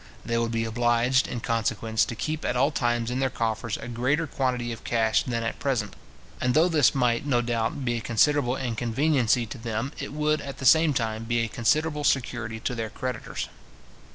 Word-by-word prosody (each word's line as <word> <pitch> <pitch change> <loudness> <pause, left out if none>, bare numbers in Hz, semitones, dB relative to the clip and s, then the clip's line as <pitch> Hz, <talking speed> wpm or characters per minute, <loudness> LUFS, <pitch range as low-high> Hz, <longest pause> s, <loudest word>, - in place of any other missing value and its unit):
They 115 - -1
would 115 0 +1
be 115 0 0
obliged, 120 +3 +2
in 120 - -4
consequence, 115 -2 0
to 115 - -6
keep 155 +7 -3
at 125 - -1
all 135 +4 +3
times 120 -4 0
in 125 - -1
their 135 0 +1
coffers 115 -1 -2
a - - -8
greater 130 +7 0
quantity 125 -4 -1
of 115 - -8
cash 110 -2 +2
than 115 -2 -2
at 115 - -3
present; 125 -7 -1 0.5
and 125 0 +1
though 160 +3 +5
this 155 -6 +3
might, 120 -3 +2
no 125 -4 +3
doubt, 120 +3 -1
be 120 -1 0
a - - -4
considerable 125 +3 +2
inconveniency 120 0 +1
to 115 +3 -8
them, 115 +3 -3
it - - -5
would, 150 +1 0
at 140 -1 -7
the 130 - -6
same 160 +1 +5
time, 110 -2 -2
be 120 0 +1
a 115 - 0
considerable 150 +7 0
security 120 -5 0
to 125 - -2
their 115 -2 -3
creditors. 125 +1 -4
120 Hz, 200 wpm, -26 LUFS, 115-135 Hz, 0.5 s, though